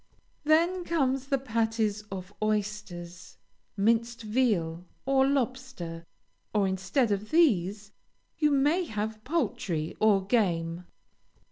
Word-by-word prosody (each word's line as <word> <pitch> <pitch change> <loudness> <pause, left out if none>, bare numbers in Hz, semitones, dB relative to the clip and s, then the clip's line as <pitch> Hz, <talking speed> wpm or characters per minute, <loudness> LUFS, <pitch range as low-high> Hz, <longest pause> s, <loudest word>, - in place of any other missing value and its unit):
Then 340 +4 +3
come 280 -7 +1
the 275 +1 -1
patties 225 -4 0
of 190 0 -6
oysters, 205 -5 -3 0.4
minced 230 +3 +1
veal, 200 -8 0 0.2
or 270 0 +4
lobster; 255 -11 -2 0.5
or, 200 -2 +3
instead 195 +6 0
of 205 +1 -2
these, 205 - +2 0.5
you 300 -2 +4
may 295 +6 +2
have 215 -3 -4
poultry 235 - -1
or 205 -3 +4
game. 175 -6 0
215 Hz, 105 wpm, -28 LUFS, 190-265 Hz, 0.5 s, or